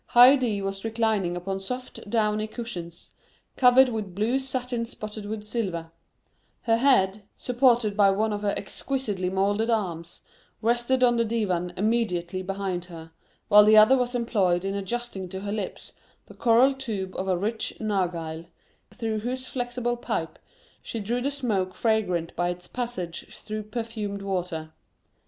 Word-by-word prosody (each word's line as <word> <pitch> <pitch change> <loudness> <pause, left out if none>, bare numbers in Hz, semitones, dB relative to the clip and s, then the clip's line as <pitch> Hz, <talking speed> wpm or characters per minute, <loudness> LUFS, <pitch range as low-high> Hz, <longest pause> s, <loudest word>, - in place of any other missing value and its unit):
Haydée 245 -4 +6
was 195 0 -4
reclining 220 -5 0
upon 190 +2 -3
soft 250 +1 -7
downy 215 -1 +1
cushions, 180 -8 -7 0.4
covered 255 +1 +6
with 215 -6 -4
blue 225 +6 +1
satin 250 -3 -3
spotted 215 -2 -6
with 215 0 -4
silver; 190 -7 -3 0.7
her 225 -1 +3
head, 215 -6 +3 0.2
supported 240 -4 +2
by 200 -1 +5
one 210 +2 +1
of 205 - -3
her 205 -1 0
exquisitely 205 -5 -2
moulded 205 +4 +1
arms, 175 -7 -2 0.4
rested 240 +3 +1
on 240 -1 +4
the 230 - +3
divan 195 -6 -1
immediately 185 -5 0
behind 190 -2 -3
her, 165 -2 -11 0.4
while 210 0 +8
the 215 +1 +6
other 215 +5 +8
was 250 -1 0
employed 195 -7 +1
in 195 - -1
adjusting 200 -1 -4
to 190 +1 -6
her 200 0 -4
lips 205 -3 -5 0.3
the - - -14
coral 245 +4 +4
tube 215 -8 -4
of 190 - -3
a 185 -2 +2
rich 220 +4 -2
narghile, 170 -6 -2 0.4
through 220 -1 -2
whose 255 +4 -3
flexible 245 -1 -2
pipe - - -3 0.4
she 230 - -5
drew 235 +4 -1
the 275 - 0
smoke 215 -10 -1
fragrant 185 -7 0
by 175 +1 0
its 180 0 -6
passage 235 -9 -4
through 215 0 -6
perfumed 215 -2 -5
water. 175 -5 -3
215 Hz, 150 wpm, -26 LUFS, 190-240 Hz, 0.7 s, while